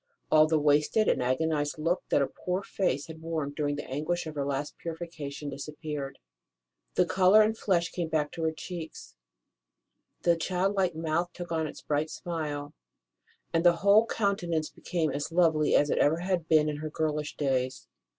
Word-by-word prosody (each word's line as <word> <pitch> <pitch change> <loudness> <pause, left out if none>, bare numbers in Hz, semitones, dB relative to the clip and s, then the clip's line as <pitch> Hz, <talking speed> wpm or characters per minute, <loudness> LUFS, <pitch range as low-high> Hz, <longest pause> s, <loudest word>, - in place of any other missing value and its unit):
All 155 0 +6
the 160 0 +2
wasted 150 +8 +3
and - - +2
agonized 145 +4 0
look 165 +4 0
that - - +3
her 140 - +2
poor 185 +2 -3
face 145 -9 -1
had 160 -1 -10
worn 160 -3 -2
during 145 -1 -1
the 145 - -6
anguish 155 +6 -2
of 155 - -6
her 145 -2 -2
last 140 +1 -3
purification 160 -4 -6
disappeared. 145 0 -5 0.8
The - - +4
colour 190 +3 +5
and 220 +1 +1
flesh 175 -6 0
came 175 -2 -2
back 150 -2 0
to 165 - -6
her 160 - +2
cheeks, 160 0 -8 1.1
the 170 -1 +4
childlike 185 +1 0
mouth 165 +2 -1
took 175 -2 -7
on 160 -1 0
its - - -10
bright 150 +1 0
smile, 150 -5 -4 0.8
and 165 0 +2
the 175 -1 +6
whole 210 +3 +6
countenance 175 -8 -1
became 165 -3 -2
as 145 +3 -3
lovely 165 -3 +3
as 145 - +3
it - - +1
had - - +7
ever 175 +5 +1
been 155 -1 +5
in 150 -1 -2
her 155 +1 -4
girlish 150 -1 -2
days. 130 -2 -1
160 Hz, 175 wpm, -29 LUFS, 150-175 Hz, 1.1 s, had